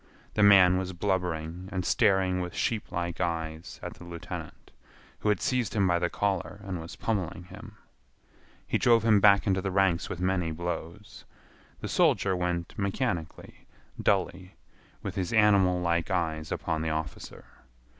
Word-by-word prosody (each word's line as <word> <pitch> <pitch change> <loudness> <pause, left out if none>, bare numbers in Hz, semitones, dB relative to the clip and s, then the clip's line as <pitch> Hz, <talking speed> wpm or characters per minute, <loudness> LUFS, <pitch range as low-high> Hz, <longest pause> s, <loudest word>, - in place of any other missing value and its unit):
The 105 - +1
man 95 -3 +7
was 95 0 -4
blubbering 90 -2 -2
and 95 -2 -2
staring 95 -4 +2
with 90 -2 -5
sheeplike 85 -6 -2
eyes 80 -2 -3
at - - -5
the - - -14
lieutenant, 85 -1 -8 0.5
who 105 - 0
had 105 -4 +2
seized 125 +2 -1
him 100 -3 +3
by 85 -1 +2
the 90 0 0
collar 100 -1 -2
and 95 -3 -4
was 80 - -9
pommeling 90 -6 -2
him. 105 +4 -12 0.9
He - - 0
drove 115 -2 +4
him 110 -3 +5
back 100 -1 +5
into 95 -1 +1
the 95 - -2
ranks 95 -3 +1
with 90 - -5
many 90 -2 0
blows. 85 +4 -6 0.6
The - - -4
soldier 95 -1 +2
went 90 -1 -2
mechanically, 100 -4 -3 0.3
dully, 90 +1 0 0.5
with 95 - -4
his 95 +1 -3
animal 100 -4 +4
like 85 -1 0
eyes 80 -4 -2
upon 80 -1 -2
the 80 - -1
officer. 80 0 -5
90 Hz, 155 wpm, -28 LUFS, 85-100 Hz, 0.9 s, man